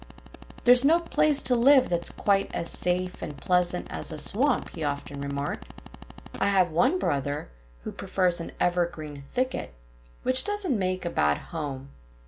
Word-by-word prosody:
"There's 245 Hz, +1 st, +6 dB
no 320 Hz, +5 st, +5 dB
place 305 Hz, -4 st, +2 dB
to 250 Hz, -, +3 dB
live 260 Hz, +3 st, +5 dB
that's 175 Hz, -1 st, -1 dB
quite 195 Hz, -1 st, +1 dB
as 170 Hz, -, -3 dB
safe 180 Hz, 0 st, -2 dB
and 150 Hz, -, -6 dB
pleasant 180 Hz, -1 st, +1 dB
as -, -, -2 dB
a 155 Hz, -, -5 dB
swamp," 250 Hz, -, 0 dB
he 160 Hz, -, -6 dB
often 145 Hz, -1 st, -4 dB
remarked. 140 Hz, 0 st, -4 dB, 0.7 s
"I -, -, +2 dB
have 190 Hz, -4 st, +3 dB
one 250 Hz, -, +2 dB
brother 145 Hz, -, -2 dB, 0.3 s
who -, -, -6 dB
prefers 180 Hz, -2 st, -1 dB
an -, -, -7 dB
evergreen 170 Hz, -5 st, -1 dB
thicket, 245 Hz, -, -3 dB, 0.5 s
which 255 Hz, 0 st, +4 dB
doesn't 415 Hz, -9 st, 0 dB
make 185 Hz, -2 st, -2 dB
a 170 Hz, -, -2 dB
bad 75 Hz, 0 st, +2 dB
home. 140 Hz, -5 st, -6 dB
180 Hz, 155 wpm, -26 LUFS, 150-250 Hz, 0.7 s, There's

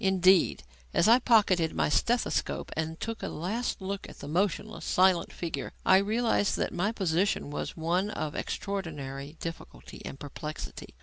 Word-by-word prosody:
Indeed, 190 Hz, -, +4 dB, 0.3 s
as 170 Hz, -, +4 dB
I 235 Hz, +3 st, +7 dB
pocketed 200 Hz, -9 st, +3 dB
my -, -, +2 dB
stethoscope 235 Hz, -, 0 dB
and 160 Hz, +1 st, -3 dB
took 225 Hz, 0 st, -4 dB
a -, -, -3 dB
last 210 Hz, +10 st, -2 dB
look 195 Hz, +1 st, -4 dB
at -, -, -12 dB
the -, -, -8 dB
motionless, 200 Hz, +6 st, -1 dB
silent 185 Hz, -1 st, +3 dB
figure, 170 Hz, -2 st, -4 dB
I 190 Hz, -, +7 dB
realized 215 Hz, +1 st, +1 dB
that -, -, -1 dB
my 180 Hz, +5 st, +1 dB
position 185 Hz, -6 st, 0 dB
was 150 Hz, -, -4 dB
one 175 Hz, +5 st, +1 dB
of 155 Hz, -7 st, -3 dB
extraordinary 150 Hz, -7 st, -4 dB
difficulty 165 Hz, 0 st, -8 dB
and 135 Hz, -, -7 dB
perplexity. 150 Hz, +2 st, -7 dB
185 Hz, 150 wpm, -29 LUFS, 160-205 Hz, 0.3 s, I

